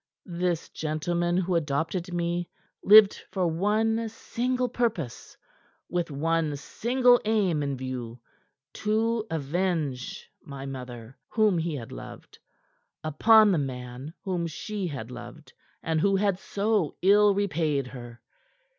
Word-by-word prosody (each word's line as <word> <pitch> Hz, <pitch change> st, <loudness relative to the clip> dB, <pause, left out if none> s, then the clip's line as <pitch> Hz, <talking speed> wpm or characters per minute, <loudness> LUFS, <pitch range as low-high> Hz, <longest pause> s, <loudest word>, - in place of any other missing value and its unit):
"This 175 Hz, -1 st, -2 dB
gentleman 175 Hz, +3 st, -1 dB
who 185 Hz, 0 st, 0 dB
adopted 165 Hz, +3 st, -1 dB
me 175 Hz, 0 st, -2 dB, 0.3 s
lived 210 Hz, 0 st, +7 dB
for 185 Hz, -1 st, -1 dB
one 215 Hz, +6 st, +1 dB
single 250 Hz, +3 st, -2 dB
purpose, 220 Hz, -, -3 dB, 0.5 s
with 175 Hz, -1 st, -1 dB
one 155 Hz, +1 st, 0 dB
single 245 Hz, -, +3 dB
aim 200 Hz, -8 st, +1 dB
in 140 Hz, -2 st, -2 dB
view 125 Hz, -2 st, -6 dB, 0.6 s
to 220 Hz, +1 st, +1 dB
avenge 155 Hz, -3 st, -2 dB
my 140 Hz, -3 st, -8 dB
mother, 125 Hz, -3 st, -8 dB
whom 215 Hz, -6 st, +2 dB
he 165 Hz, -1 st, -2 dB
had 120 Hz, -5 st, -7 dB
loved, -, -, -10 dB, 0.6 s
upon 215 Hz, +8 st, +5 dB
the 175 Hz, -, +2 dB
man 130 Hz, +2 st, -6 dB
whom 180 Hz, -3 st, -1 dB
she 195 Hz, +4 st, -4 dB
had 130 Hz, -6 st, -6 dB
loved 120 Hz, +5 st, -10 dB, 0.3 s
and 160 Hz, -1 st, 0 dB
who 195 Hz, +2 st, +3 dB
had 195 Hz, -1 st, +1 dB
so 200 Hz, -5 st, -1 dB
ill 205 Hz, +1 st, +5 dB
repaid 160 Hz, -8 st, 0 dB
her. 120 Hz, -2 st, -10 dB
170 Hz, 120 wpm, -27 LUFS, 140-205 Hz, 0.6 s, lived